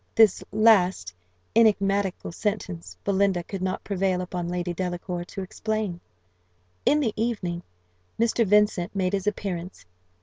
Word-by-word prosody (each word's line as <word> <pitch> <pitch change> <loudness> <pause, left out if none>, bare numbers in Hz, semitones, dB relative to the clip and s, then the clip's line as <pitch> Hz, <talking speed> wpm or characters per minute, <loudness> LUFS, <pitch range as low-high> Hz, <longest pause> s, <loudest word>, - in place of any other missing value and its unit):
This 220 -4 +5
last 190 - +4 0.4
enigmatical 200 -5 +2
sentence 90 - -4
Belinda 195 -2 +2
could 190 +2 -6
not 185 0 -2
prevail 190 -2 0
upon 180 -1 -4
Lady 175 0 -2
Delacour 175 0 -3
to 195 +1 -6
explain. 215 -2 -3 0.9
In 300 - +5
the 235 -8 0
evening 205 -7 -2 0.6
Mr. 230 0 +3
Vincent 210 -2 +2
made 185 -1 0
his 195 0 -1
appearance. 185 - -3
190 Hz, 125 wpm, -26 LUFS, 175-210 Hz, 0.9 s, This